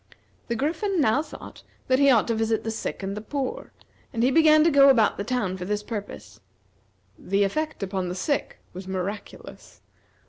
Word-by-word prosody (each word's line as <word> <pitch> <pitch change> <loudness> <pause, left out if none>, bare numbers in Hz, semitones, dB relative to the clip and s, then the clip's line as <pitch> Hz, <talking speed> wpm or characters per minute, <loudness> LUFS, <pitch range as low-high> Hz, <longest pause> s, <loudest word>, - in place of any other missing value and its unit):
The 235 - -2
Griffin 345 - -1
now 275 0 +3
thought 320 - -11 0.3
that 260 0 +3
he 280 0 +5
ought 235 -5 +4
to - - +2
visit 225 0 0
the 225 - -3
sick 220 - -5
and 195 +1 -3
the 210 - -5
poor; 270 +3 -4 0.4
and 230 -2 -1
he 255 - +3
began 310 +1 +6
to 330 - +4
go 280 -1 +7
about 230 -6 +3
the 200 - -3
town 215 -6 -2
for 180 - -6
this 210 +2 -2
purpose. 210 -2 -8 0.8
The 200 +2 0
effect 310 +5 -2
upon 190 -2 -3
the 180 - -4
sick 280 +10 -2 0.2
was 185 +1 -9
miraculous. 190 +2 -7
225 Hz, 185 wpm, -25 LUFS, 200-280 Hz, 0.8 s, go